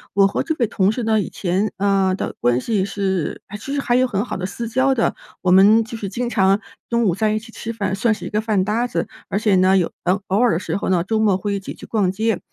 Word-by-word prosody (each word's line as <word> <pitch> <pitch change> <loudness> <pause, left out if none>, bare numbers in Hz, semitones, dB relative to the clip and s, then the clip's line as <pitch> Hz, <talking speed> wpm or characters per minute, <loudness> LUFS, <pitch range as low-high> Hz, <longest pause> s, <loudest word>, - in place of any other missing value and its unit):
我 200 0 +6
和 195 - 0
这 320 - -2
位 240 - +2
同 200 -2 +1
事 240 +2 -3
呢 220 -1 +2
以 - - -5
前， 190 +3 -1
呃 195 -1 +2
的 - - -4
关 120 0 +2
系 205 - 0
是 190 -4 -2 0.2
其 275 +7 -5
实 - - 0
还 250 -3 +1
有 255 +1 +3
很 205 -2 -1
好 - - -4
的 185 0 -3
私 235 +4 -5
交 260 +4 +2
的。 230 - +1 0.3
我 180 - +2
们 205 +5 +6
就 225 +1 -8
是 205 -3 -5
经 240 +5 -3
常 195 -2 +3 0.3
中 235 0 +1
午 190 -6 +2
在 215 +4 +1
一 - - 0
起 225 +2 -9
吃 230 - -6
饭， 210 -4 -2
算 220 +4 +1
是 215 - -3
一 - - -4
个 210 - 0
饭 215 -4 +1
搭 225 +4 0
子， 170 -8 -2 0.2
而 - - -1
且 210 -1 +2
呢， 185 +1 +4
有 180 - 0 0.4
偶 195 +2 +1
尔 245 -1 +4
的 - - +1
时 185 - -3
候 200 - -2
呢， 180 -3 +2
周 220 +4 -1
末 205 -4 +3
会 200 +2 -3
一 200 - -1
起 195 - -8
去 - - -11
逛 205 -5 +1
街。 220 +1 0
205 Hz, 295 characters per minute, -20 LUFS, 190-225 Hz, 0.4 s, 我